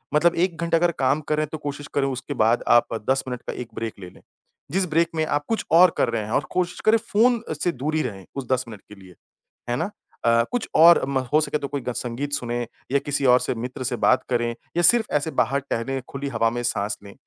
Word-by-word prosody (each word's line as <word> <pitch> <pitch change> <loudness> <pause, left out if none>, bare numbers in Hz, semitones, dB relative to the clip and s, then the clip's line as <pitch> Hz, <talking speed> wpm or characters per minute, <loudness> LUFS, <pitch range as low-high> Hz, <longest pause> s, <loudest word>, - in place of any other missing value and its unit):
मतलब 170 +3 +4
1 175 -3 -7
घंटा 165 0 +2
अगर 175 +1 +2
काम 135 +3 +2
करें 155 0 +1
तो 155 - -6
कोशिश 145 -1 -6
करें 135 -1 +2
उसके 135 +2 -4
बाद 115 +2 +2
आप 120 -1 +4 0.2
10 135 0 +2
मिनट 125 -1 -4
का - - -3
एक 125 -2 -7
ब्रेक 115 -1 -4
ले 90 - -9
लें। - - -19 0.5
जिस 190 +3 +1
ब्रेक 165 +2 +2
में 155 -1 +1
आप 145 -1 -1
कुछ 225 - -1
और 175 +2 +7
कर - - +2
रहे 115 -2 -2
हैं 110 - -7
और 140 - +1
कोशिश 180 -1 -1
करें 220 +1 +6 0.2
फ़ोन 235 +2 +4 0.2
से 175 - +2
दूर 150 +2 -3
ही 155 - +2
रहें 95 -3 -6
उस 135 -3 -5
10 130 -1 +1
मिनट 105 -4 -10
के 105 - -11
लिए। 90 -2 -15 0.5
है 120 - +1
ना? 170 +6 -2 0.3
अ, 115 0 +4
कुछ 245 -2 -2
और 170 +2 +7
म 135 -1 0
हो 155 - +6
सके 150 - -1
तो 140 - -4
कोई 140 0 -4
ग 125 0 -4
संगीत 130 +4 -4
सुनें 120 -3 -2 0.2
या 140 - +3
किसी 145 0 -2
और 125 0 +6
से - - -2
मित्र 125 +3 -5
से 125 0 -1
बात 130 +1 +3
करें 120 -1 +1 0.3
या 175 - +3
सिर्फ़ 235 +5 +5
ऐसे 150 +2 0
बाहर 140 0 +1
टहले 135 +4 -2
खुली 140 +1 -5
हवा 115 -3 +1
में 120 +1 -3
साँस 105 -3 -1
लें, 100 -1 -11
135 Hz, 250 wpm, -23 LUFS, 120-160 Hz, 0.5 s, और